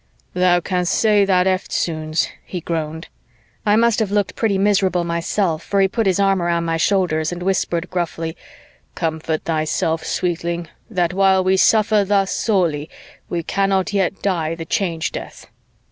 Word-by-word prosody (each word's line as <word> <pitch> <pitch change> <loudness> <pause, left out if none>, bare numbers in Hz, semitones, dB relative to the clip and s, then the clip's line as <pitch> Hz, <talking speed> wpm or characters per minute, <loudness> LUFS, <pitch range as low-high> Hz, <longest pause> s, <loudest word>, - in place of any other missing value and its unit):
"Thou 180 -1 +3
can'st 180 -1 -1
say 210 -2 +3
that 185 -2 +3
eftsoons," 160 -4 -1 0.2
he 180 - -5
groaned. 160 -1 -4 0.6
I 205 - +5
must 230 0 +3
have 220 -3 0
looked 205 -1 0
pretty 210 -4 +1
miserable 190 -3 +2
myself, 170 0 -1
for 200 - -1
he 195 - +5
put 220 +2 -1
his 190 0 +2
arm 195 -2 +2
around 170 -1 0
my 165 0 0
shoulders 165 -4 +1
and 175 0 -5
whispered 180 -2 -1
gruffly, 165 -2 -3 0.6
"Comfort 160 -1 -2
thyself, 160 0 -1
sweetling, 170 -1 -2 0.2
that 180 -5 0
while 190 0 +3
we 190 +1 +3
suffer 215 +1 +4
thus 195 -1 +1
sorely, 170 -8 0 0.4
we 175 - -2
yet 165 - -4
cannot 195 -1 +1 0.3
die 165 -5 0
the 165 0 -7
Change 165 -2 -1
Death." - - -8
180 Hz, 155 wpm, -20 LUFS, 165-195 Hz, 0.6 s, I